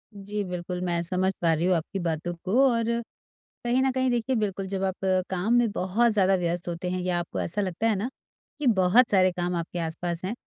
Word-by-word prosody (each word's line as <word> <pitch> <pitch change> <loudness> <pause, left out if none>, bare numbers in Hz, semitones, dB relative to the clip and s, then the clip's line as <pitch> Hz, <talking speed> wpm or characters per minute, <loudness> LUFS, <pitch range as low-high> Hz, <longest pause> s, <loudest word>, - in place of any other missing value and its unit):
जी 205 +1 -4
बिल्कुल, 180 0 -4
मैं 170 -1 0
समझ 185 +2 +1
पा 165 -2 +3
रही 165 +3 0
हूँ 185 - +3
आपकी 170 +4 -3
बातों 165 +1 -2
को 240 +9 +4
और 230 -2 +1 0.8
कहीं 245 +2 +2
न 265 - +2
कहीं 260 0 +1
देखिए 240 +2 0
बिल्कुल 195 -3 -2
जब 195 0 -3
आप 190 0 0 0.3
काम 190 +5 0
में 240 -1 +4
बहुत 210 +6 +1
ज़्यादा 195 -2 +4
व्यस्त 175 -1 -2
होते 175 +1 -3
हैं 185 0 -2
या 180 -1 0
आपको 170 - -4
ऐसा 190 +5 -2
लगता 195 +3 -1
है 220 - +2
ना 215 +7 -2 0.5
कि 285 - 0
बहुत 215 +3 +5
सारे 185 -2 +4
काम 175 0 -2
आपके 170 +1 -4
आस-पास 170 +1 -3
हैं, 195 - -2
185 Hz, 220 wpm, -26 LUFS, 175-220 Hz, 0.8 s, बहुत